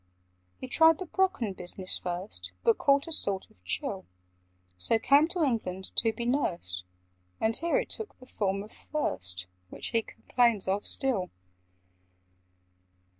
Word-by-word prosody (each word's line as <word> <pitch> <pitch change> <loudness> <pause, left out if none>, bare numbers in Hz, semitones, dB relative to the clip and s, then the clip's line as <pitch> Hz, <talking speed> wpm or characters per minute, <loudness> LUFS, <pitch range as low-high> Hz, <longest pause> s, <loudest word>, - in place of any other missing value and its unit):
"He 260 - -7
tried 320 +4 +6
the 370 - -5
Brocken 365 - 0
business 185 +1 -1
first, 175 - -5
But 230 - +4
caught 280 0 +4
a 330 - -8
sort 200 -11 0
of 90 - -23
chill; 95 0 -2 0.7
So 90 - +3
came 280 +7 +5
to 345 -1 0
England 190 -8 -1
to 225 - +4
be 235 +2 -5
nursed, 170 - -1 0.5
And 220 0 +2
here 340 +8 +3
it - - -2
took 445 -2 -4
the 255 - -14
form 195 -4 -1
of 215 - -13
thirst, 90 - -3 0.2
Which - - -6
he 230 - +2
complains 235 -3 +1
of 195 +2 0
still. 235 -9 -1
220 Hz, 145 wpm, -29 LUFS, 180-280 Hz, 0.7 s, tried